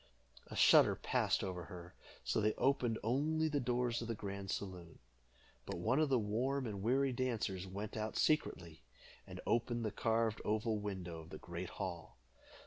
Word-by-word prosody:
A - - -8
shudder - - +7
passed - - +1
over 90 -3 -4
her, 90 0 -10 0.3
so - - +1
they 105 +1 +3
opened 125 -4 +2
only 155 +7 +1
the 150 -2 0
doors 120 -1 0
of 115 - -4
the 115 - -2
grand 100 -1 -5
saloon. 90 -5 -5 0.7
But - - -3
one 115 - +2
of 155 -2 +3
the 130 - +4
warm 125 +6 0
and 100 -4 -4
weary 130 +5 +2
dancers 115 -7 -1
went 100 +3 -5
out 110 0 -3
secretly, 85 - +1 0.5
and - - -8
opened 120 0 +1
the 110 - -1
carved 115 0 +1
oval 110 +1 0
window 95 -5 -5
of 80 - -13
the - - -7
great 85 +1 -6
hall. 90 -4 -6
110 Hz, 170 wpm, -37 LUFS, 95-125 Hz, 0.7 s, shudder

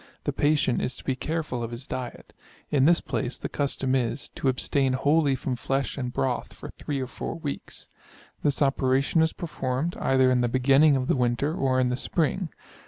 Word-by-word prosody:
The - - -1
patient 145 -4 +2
is 125 - -2
to - - -11
be 135 - -1
careful 150 -3 -3
of 115 - -3
his 120 +3 -7
diet. 125 -3 -6 0.4
In 140 -2 +4
this 170 +2 +5
place 130 -1 -3
the - - -4
custom 135 -2 -1
is, 125 0 -1
to - - -3
abstain 135 +1 +1
wholly 145 +1 +3
from 130 0 -3
flesh 135 +2 -1
and 125 -3 -3
broth 125 0 -2
for - - -9
3 145 -2 -4
or - - -1
4 125 - -5
weeks. 150 -4 -6 0.5
This 145 0 +2
operation 135 +3 +2
is 160 0 +3
performed, 155 -1 -3
either 130 -1 +3
in 125 -1 +3
the 120 - +2
beginning 135 +4 +5
of 130 -1 -1
the - - +2
winter, 125 +4 +1
or 130 -5 +1
in 125 -1 +2
the 125 - 0
spring. 165 +6 -1
135 Hz, 195 wpm, -26 LUFS, 130-145 Hz, 0.5 s, this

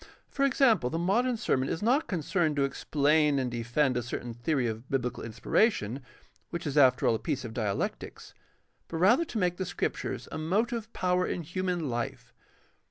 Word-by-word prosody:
For 275 - +1
example, 245 - +3
the 165 - -2
modern 230 +8 +1
sermon 135 - 0
is 160 - -3
not 260 +7 +2
concerned 170 -2 0
to 140 - +2
explain 145 +1 +2
and 130 -2 -1
defend 120 +3 0
a 125 - 0
certain 120 0 -5
theory 125 +3 0
of 115 +2 -4
biblical 125 -3 -2
inspiration, 120 - 0 0.5
which 170 - -5
is 145 -2 -3
after 130 -4 +5
all - - +4
a 110 - -1
piece 140 -5 -3
of 110 - -7
dialectics, 105 -5 -3 0.5
but 165 - -5
rather 230 - +4
to 245 - -6
make 180 -3 +1
the 190 - -2
Scriptures 175 - -3
a - - -4
motive 220 +7 -1
power 180 0 +1
in 175 - -3
human 180 +1 -2
hfe. 120 -4 -4
155 Hz, 175 wpm, -29 LUFS, 125-185 Hz, 0.5 s, after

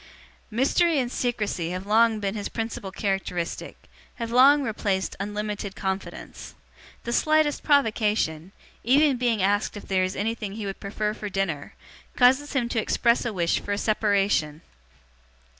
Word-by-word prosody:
Mystery 285 +8 +2
and 250 -3 0
secrecy 210 -10 -2
have 185 +2 -5
long 220 +1 +3
been 200 -1 -2
his 205 -2 -4
principal 225 -3 -5
characteristic, 195 -4 -3 0.4
have 230 -1 -5
long 275 +4 +6
replaced 205 -5 -2
unlimited 205 0 -4
confidence. 190 0 -5 0.5
The 235 - -3
slightest 310 +1 +2
provocation, 215 - +1 0.3
even 275 +3 +4
being 235 -5 +1
asked 205 +2 +1
if 205 - -10
there 190 -1 +1
is 185 0 -2
anything 215 -1 -3
he 215 0 -5
would 195 -1 -5
prefer 210 +1 -2
for 210 -1 -6
dinner, 180 -7 -3 0.4
causes 265 +3 +4
him 255 -4 +1
to 230 -2 0
express 235 +2 +2
a 235 - -1
wish 170 -4 0
for 205 - -3
a - - -1
separation. 200 -8 +1
210 Hz, 145 wpm, -25 LUFS, 195-240 Hz, 0.5 s, long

